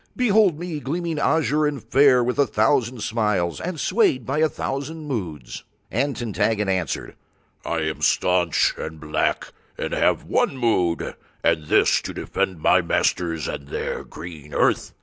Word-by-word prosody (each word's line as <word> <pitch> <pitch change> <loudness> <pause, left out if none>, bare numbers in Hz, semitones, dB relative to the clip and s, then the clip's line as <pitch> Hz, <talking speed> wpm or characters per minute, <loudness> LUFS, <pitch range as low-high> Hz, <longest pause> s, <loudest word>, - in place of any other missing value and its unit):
Behold 210 -8 +3
me 170 -2 -4
gleaming 165 +2 -3
azure 150 0 +2
and 140 -6 -4
fair 125 +2 +5
with 125 +3 -2
a 140 - +4
thousand 115 +2 +1
smiles, 105 -7 0
and 175 -2 -4
swayed 185 - +2
by 140 +3 -1
a 160 0 +3
thousand 150 +4 -4
moods." 85 - -5 0.3
And 135 +5 0
Tintaggon 110 -2 0
answered: 95 -5 -2 0.5
"I 85 -1 -2
am 80 0 -3
staunch 90 -2 +2
and 80 0 -6
black 75 0 -1 0.3
and - - -3
have - - +2
one 135 - 0
mood, 95 -9 0 0.3
and 80 - +2
this—to - - +2
defend 90 -4 -2
my - - +4
masters 85 -3 0
and 70 - -5
their - - -4
green 75 -4 -10
earth." - - +1
120 Hz, 150 wpm, -23 LUFS, -, 0.5 s, fair